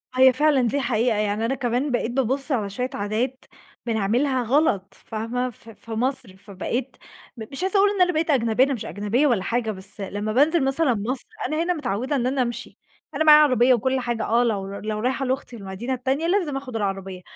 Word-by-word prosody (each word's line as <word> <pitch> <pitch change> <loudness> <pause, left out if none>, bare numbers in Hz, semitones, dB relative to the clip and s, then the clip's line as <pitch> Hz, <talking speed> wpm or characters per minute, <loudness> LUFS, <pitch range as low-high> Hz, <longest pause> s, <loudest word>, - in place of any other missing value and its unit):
هي 260 0 +6
فعلًا 295 -1 +3
دي 285 - 0
حقيقة، 235 -2 +1
يعني 210 +1 0
أنا 265 +3 0
كمان 255 +2 -1
بقيت 240 -1 -1
بابُص 270 +3 -1
على 215 -7 0
شوية 250 +6 -3
عادات 230 +6 -2 0.4
بنعملها 240 +4 +1
غلط، 225 -7 +1
فاهمة؟ 235 +3 -3
ف 230 -1 -15
في 225 +1 -13
مصر 245 -3 -2
فبقيت 215 +6 -4 0.4
م 220 - -6
مش 275 +6 -4
عاوزه 385 +2 +1
أقول 405 +1 +5
إن 400 -2 -1
أنا 360 0 +4
بقيت 320 +1 0
أجنبية، 240 -3 +3
أنا 275 - -1
مش 230 - -5
أجنبية 210 +8 0
ولا 225 -8 +1
حاجة، 230 -1 -1
بس 195 +1 -10
لمّا 205 +2 -3
بانزل 300 +4 +3
مثلًا 270 0 +2
مصر 235 +5 -3 0.2
أنا 310 +3 -1
هنا 360 +1 +1
متعودة 260 - -2
إن 250 -2 0
أنا 265 +1 0
أمشي، 240 -1 -4 0.4
أنا 315 - +1
معايا 300 -1 +9
عربية 255 -2 +4
وكل 260 +3 +1
حاجة 240 -2 -2
آه 235 +2 +3
لو 205 -5 -1
لو 215 0 -3
رايحة 260 +3 -1
لاختي 260 -1 -3
المدينة 200 +5 -5
التانية 265 +6 -1
لازم 340 -7 0
آخد 260 -3 -7
العربية، 195 -3 -3
245 Hz, 200 wpm, -23 LUFS, 215-270 Hz, 0.4 s, معايا